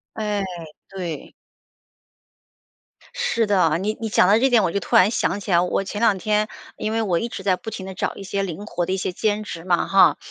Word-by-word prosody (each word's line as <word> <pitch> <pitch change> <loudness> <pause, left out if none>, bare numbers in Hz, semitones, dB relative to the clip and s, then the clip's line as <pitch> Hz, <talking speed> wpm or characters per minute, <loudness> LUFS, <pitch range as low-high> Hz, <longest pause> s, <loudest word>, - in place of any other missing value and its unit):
哎， 210 -2 -1 0.4
对。 175 -5 -6 1.8
是 230 -1 0
的， 180 -6 +3
你 210 +4 -1
你 225 - -2
讲 205 - +4
到 210 +2 +5
这 265 +3 +3
点， 240 -4 +4
我 185 - +1
就 200 - -1
突 - - 0
然 185 +3 +6
想 220 -3 0
起 200 - -7
来， 170 -1 +5
我 180 +2 0
前 205 +2 -5
两 225 -4 +4
天 210 +2 0 0.3
因 215 - -3
为 225 0 0
我 180 -6 +1
一 230 - -3
直 200 - -7
在 190 -2 +2
不 225 - -11
停 200 -3 -7
地 190 - -7
找 - - -2
一 - - -9
些 195 0 -2
灵 195 +1 -5
活 175 -5 -2
的 185 - -2
一 - - +1
些 185 -1 -3
兼 210 +3 -1
职 170 -5 -7
嘛， 175 -2 +1
哈。 185 -6 +5
195 Hz, 245 characters per minute, -22 LUFS, 185-215 Hz, 1.8 s, 然